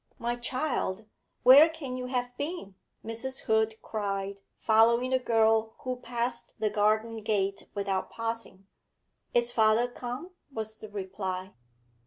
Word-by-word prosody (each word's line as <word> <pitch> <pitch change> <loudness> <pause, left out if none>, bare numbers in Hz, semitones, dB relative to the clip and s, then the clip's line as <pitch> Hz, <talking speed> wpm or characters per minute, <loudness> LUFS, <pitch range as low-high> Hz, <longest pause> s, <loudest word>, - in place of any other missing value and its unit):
'My 240 +1 -1
child, 240 -5 -1 0.4
where 275 +6 +9
can 295 -6 -6
you 250 0 -4
have 245 -1 -2
been?' 285 - -5 0.3
Mrs. 230 +4 -4
Hood 220 0 +2
cried, 200 -2 -3 0.2
following 235 +3 +4
the 260 - +3
girl 225 -2 +2
who 255 -1 -3
passed 240 0 -3
the 215 -1 0
garden 215 +2 +2
gate 200 -2 -1
without 195 -2 -1
pausing. 230 -4 -5 0.7
'Is 240 0 +3
father 220 +1 +4
come?' 245 +7 -6 0.2
was 220 -3 -5
the 215 - -9
reply. 190 -1 -4
225 Hz, 130 wpm, -29 LUFS, 210-245 Hz, 0.7 s, where